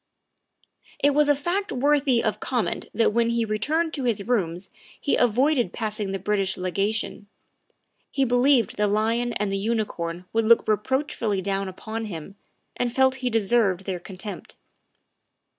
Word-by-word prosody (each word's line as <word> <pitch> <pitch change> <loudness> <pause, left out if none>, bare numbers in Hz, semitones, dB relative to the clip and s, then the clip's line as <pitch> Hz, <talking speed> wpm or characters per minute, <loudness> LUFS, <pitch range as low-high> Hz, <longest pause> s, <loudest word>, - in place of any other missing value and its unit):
It 285 - +3
was 295 +1 +3
a 290 - +5
fact 350 +8 -2
worthy 275 -2 +2
of 220 - -1
comment 245 -4 -2
that 225 0 +2
when 235 0 +2
he 235 -1 +1
re 215 0 -2
turned 320 +7 0
to 275 - -3
his 215 -4 -1
rooms 185 -6 -1 0.3
he - - +1
avoided 250 +3 +2
passing 215 -3 -3
the 195 - -1
British 195 0 -1
Legation; 200 +3 -2 0.8
he 275 - +1
believed 245 -2 +3
the 210 0 +2
lion 225 +3 +1
and 205 -2 -1
the 195 - 0
unicorn 195 -6 -2
would 225 0 +2
look 230 +1 +5
reproachfully 220 -1 0
down 195 0 -1
upon 220 +4 -5
him 175 -2 -7 0.4
and 245 -1 -2
felt 265 0 +3
he 250 - 0
deserved 210 -4 +1
their 185 -3 -3
contempt. 195 +3 -8
225 Hz, 155 wpm, -25 LUFS, 200-250 Hz, 0.8 s, a